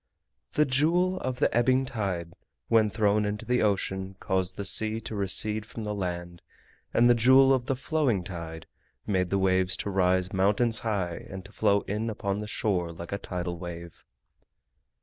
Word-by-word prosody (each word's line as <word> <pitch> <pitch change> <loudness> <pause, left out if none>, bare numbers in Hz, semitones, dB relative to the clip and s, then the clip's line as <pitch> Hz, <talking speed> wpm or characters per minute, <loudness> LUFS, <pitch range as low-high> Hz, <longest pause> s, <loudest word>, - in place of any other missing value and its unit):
The 150 - +3
Jewel 170 +7 +1
of 130 -1 -3
the - - +1
Ebbing 130 +2 +3
Tide 95 -9 -3 0.4
when 110 -2 +4
thrown 105 -1 +1
into 105 0 -3
the 125 0 +1
ocean 95 -2 -1
caused 95 -2 -1
the 100 - -4
sea 110 +3 +4
to 110 - -7
recede 105 +2 +2
from 110 +1 -8
the 105 0 -3
land, 85 -3 -5 0.5
and 120 - +4
the 120 - +6
Jewel 130 +3 +5
of 125 -1 -1
the 135 - 0
Flowing 135 - 0
Tide 80 -3 -7 0.4
made 95 -3 0
the 100 - +1
waves 95 -1 +2
to 100 - -3
rise 95 -1 +1
mountains 105 +4 +2
high 95 -6 -3
and 95 0 -8
to 100 - -12
flow 100 -2 +2
in 105 +3 -3
upon 100 -2 -3
the 105 - -5
shore 95 -6 -1
like 85 +1 -9
a 100 - -3
tidal 90 -3 -5
wave. 85 -1 -9
100 Hz, 175 wpm, -27 LUFS, 95-115 Hz, 0.5 s, the